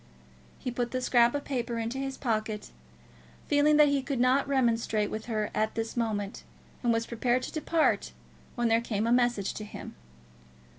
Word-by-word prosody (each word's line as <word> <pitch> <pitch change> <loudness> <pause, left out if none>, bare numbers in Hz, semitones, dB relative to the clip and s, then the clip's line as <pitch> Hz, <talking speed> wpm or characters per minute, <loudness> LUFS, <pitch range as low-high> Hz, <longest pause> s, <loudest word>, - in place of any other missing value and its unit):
He 250 - -4
put 240 0 -2
the 255 - -2
scrap 240 0 +3
of 285 - -2
paper 240 -3 -2
into 230 +3 -3
his 270 0 -4
pocket, 215 -3 -2 0.8
feeling 295 +1 +4
that 300 -1 +7
he 280 -1 +1
could 265 -1 -3
not 255 +3 +3
remonstrate 230 -5 +1
with 220 0 -4
her 215 -3 -2
at 215 0 0
this 225 0 -3
moment, 215 -4 -2 0.4
and 240 - +2
was 230 0 +1
prepared 245 +2 0
to - - -5
depart, 320 0 +1 0.4
when 240 -1 +1
there 225 0 +3
came 220 -2 -1
a 230 - +1
message 240 -5 +2
to 215 - -6
him. 210 - -9
240 Hz, 180 wpm, -29 LUFS, 225-265 Hz, 0.8 s, that